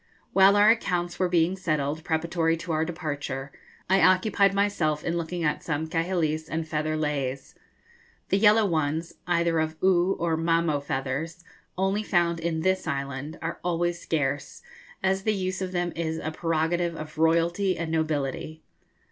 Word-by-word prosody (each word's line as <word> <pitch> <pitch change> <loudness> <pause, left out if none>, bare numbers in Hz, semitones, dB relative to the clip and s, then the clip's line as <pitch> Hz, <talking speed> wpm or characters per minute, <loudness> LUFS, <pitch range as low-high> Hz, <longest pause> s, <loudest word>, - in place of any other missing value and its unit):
While 195 +1 +6
our 205 +1 +7
accounts 175 -6 -1
were 185 -1 +2
being 175 +1 +2
settled, 155 -4 -2
preparatory 165 0 0
to 170 +1 -6
our 155 0 +1
departure, 145 -5 -4 0.4
I 190 0 +3
occupied 185 +2 +4
myself 195 -7 0
in 165 - -1
looking 170 +1 -3
at 150 -1 0
some 155 -1 -2
kahilis 160 -1 -1
and 160 0 -3
feather 155 0 -1
leis. 140 -3 -2 0.8
The 195 - +2
yellow 215 +1 +5
ones, 160 -1 -1
either 170 -2 +2
of 160 0 -1
Oo 185 0 +4
or 165 -1 +1
Mamo 165 -2 +1
feathers, 140 +6 -3 0.3
only 195 +2 +1
found 170 -4 +1
in 165 -1 -2
this 185 0 0
island, 140 +1 -4
are 165 +1 -4
always 175 0 -1
scarce, 145 -3 -2 0.4
as 190 0 +1
the 215 +1 0
use 185 0 -2
of 185 -1 -3
them 175 -1 -1
is 160 -1 -2
a 155 - -4
prerogative 165 +1 0
of 155 -1 -8
royalty 170 +4 +2
and 165 -1 -3
nobility. 155 -1 -2
165 Hz, 155 wpm, -26 LUFS, 155-180 Hz, 0.8 s, our